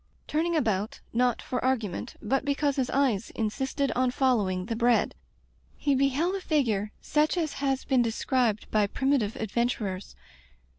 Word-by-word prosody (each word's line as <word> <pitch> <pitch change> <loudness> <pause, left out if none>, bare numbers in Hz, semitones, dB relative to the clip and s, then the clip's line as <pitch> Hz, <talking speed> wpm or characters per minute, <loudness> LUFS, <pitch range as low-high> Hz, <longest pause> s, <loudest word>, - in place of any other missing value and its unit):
Turning 330 +3 0
about, 215 -8 0
not 245 0 +1
for 250 - -3
argument, 240 -4 -1
but 265 +5 +1
because 285 0 0
his 255 -2 0
eyes 255 -7 +1
insisted 265 +5 -1
on 255 +2 +1
following 215 -9 +1
the 230 +2 -3
bread, 235 +1 +2 0.6
he 285 - +1
beheld 275 +7 +2
a 390 - -3
figure 225 - 0
such 305 +3 +1
as 315 -4 -1
has 270 -2 0
been 265 -3 +3
described 230 -1 0
by 210 -2 +3
primitive 265 -2 0
adventurers. 215 -3 -2
250 Hz, 145 wpm, -28 LUFS, 220-275 Hz, 0.6 s, been